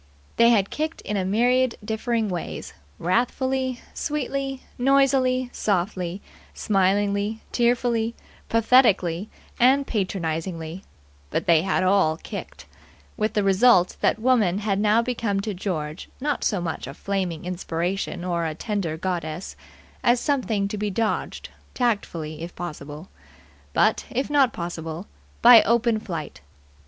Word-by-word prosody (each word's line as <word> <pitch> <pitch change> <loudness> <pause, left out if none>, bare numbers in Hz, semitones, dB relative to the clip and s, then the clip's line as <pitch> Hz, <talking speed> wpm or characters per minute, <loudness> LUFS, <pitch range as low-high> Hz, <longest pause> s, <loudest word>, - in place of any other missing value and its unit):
They 235 0 +6
had 205 -4 +3
kicked 315 +2 -3
in 210 - -4
a 195 - 0
myriad 245 +5 +2
differing 225 +1 -1
ways 180 -4 -5 0.2
wrathfully, 255 +6 0
sweetly, 275 -2 -3 0.2
noisily, 255 -1 +3
softly, 185 -1 -1 0.3
smilingly, 200 +2 +1
tearfully, 235 -1 +1 0.3
pathetically 215 -6 +3 0.3
and 265 +3 +5
patronizingly; 170 -4 -3 0.5
but - - -2
they 165 -2 +5
had 190 +1 0
all 185 -4 +3
kicked; - - -8 0.5
with 215 0 -1
the 210 - +2
result 195 -1 +4
that - - +2
woman 220 -6 +2
had 200 -1 -1
now 215 +2 +3
become 230 -5 -1
to 210 +1 -3
George 170 -4 -4
not 290 +2 -1
so 205 - +1
much 165 -6 -4
a 135 - -8
flaming 185 -5 -3
inspiration 175 0 -3
or 170 -2 -1
a 155 - -4
tender 190 -5 -3
goddess 170 -1 -4 0.5
as 240 0 +4
something 235 -9 0
to 210 - -4
be 210 0 -1
dodged 215 +3 -2 0.3
tactfully, 170 -10 -2
if 170 +1 -7
possible; 155 -1 -7 0.6
but, - - +2
if 265 +3 -2
not 275 -4 +4
possible, 170 0 -5 0.4
by 235 -1 +10
open 235 -1 +2
flight. 165 - -6
205 Hz, 125 wpm, -24 LUFS, 175-240 Hz, 0.6 s, by